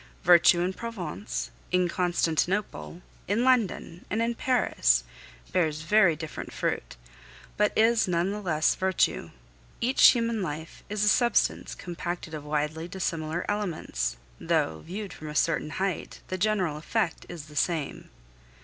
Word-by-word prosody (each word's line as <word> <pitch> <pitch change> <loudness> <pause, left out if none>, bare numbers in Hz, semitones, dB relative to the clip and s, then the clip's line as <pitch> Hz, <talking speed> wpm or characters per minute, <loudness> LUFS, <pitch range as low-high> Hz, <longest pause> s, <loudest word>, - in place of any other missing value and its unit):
Virtue 175 0 +6
in 180 +2 0
Provence, 205 -4 -5 0.2
in 180 0 +3
Constantinople, 175 +1 -1 0.2
in 210 +5 +1
London, 225 -8 +1
and 220 - -1
in 230 +1 +1
Paris 220 - +2 0.5
bears 155 -4 0
very 190 -2 +4
different 155 0 -7
fruit, - - -3 0.6
but 210 0 +2
is 225 0 +4
none 175 +1 +1
the 210 +1 -4
less 155 -5 +2
virtue. 190 -1 0 0.5
Each 255 +3 +6
human 230 -3 +2
life 160 -2 -6
is 210 0 -1
a - - +2
substance 240 +2 +2
compacted 175 -1 -5
of 150 -2 -5
widely 150 +2 -2
dissimilar 170 -2 -3
elements, 160 - -2 0.2
though, 80 0 0
viewed 195 - -6
from 155 - -8
a 150 - -7
certain 155 -1 +1
height, 190 +2 -3
the 185 - -2
general 185 -6 +1
effect 175 +3 -2
is 170 -4 -7
the 150 -1 -14
same. 155 -2 -1
175 Hz, 140 wpm, -27 LUFS, 155-210 Hz, 0.6 s, Virtue